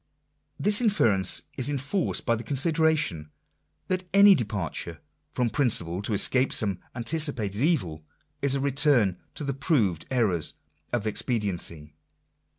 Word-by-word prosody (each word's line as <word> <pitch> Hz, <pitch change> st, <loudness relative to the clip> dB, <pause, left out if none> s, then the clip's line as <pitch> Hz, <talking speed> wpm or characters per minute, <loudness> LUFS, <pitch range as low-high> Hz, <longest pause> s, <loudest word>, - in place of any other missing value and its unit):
This 210 Hz, +2 st, +5 dB
inference 110 Hz, -, +1 dB, 0.2 s
is 130 Hz, +2 st, +2 dB
enforced 145 Hz, +7 st, -2 dB
by 115 Hz, -, +2 dB
the 115 Hz, 0 st, -4 dB
consideration, 145 Hz, -, 0 dB, 0.6 s
that 185 Hz, -1 st, -3 dB
any 200 Hz, 0 st, +8 dB
departure 105 Hz, -, -4 dB, 0.3 s
from 120 Hz, -2 st, -1 dB
prin 140 Hz, +3 st, +1 dB
ciple 85 Hz, -3 st, 0 dB
to 110 Hz, -, 0 dB
escape 130 Hz, +6 st, +2 dB
some 100 Hz, -4 st, -1 dB, 0.2 s
anticipated 120 Hz, -5 st, +1 dB
evil, 90 Hz, -, 0 dB, 0.4 s
is 140 Hz, -1 st, +3 dB
a -, -, -1 dB
return 135 Hz, -, +2 dB, 0.2 s
to -, -, -5 dB
the 140 Hz, -1 st, -2 dB
proved 115 Hz, -, 0 dB
errors 105 Hz, -, 0 dB, 0.4 s
of 120 Hz, -3 st, -2 dB
expediency. 95 Hz, -9 st, -3 dB
120 Hz, 130 wpm, -26 LUFS, 100-145 Hz, 0.6 s, any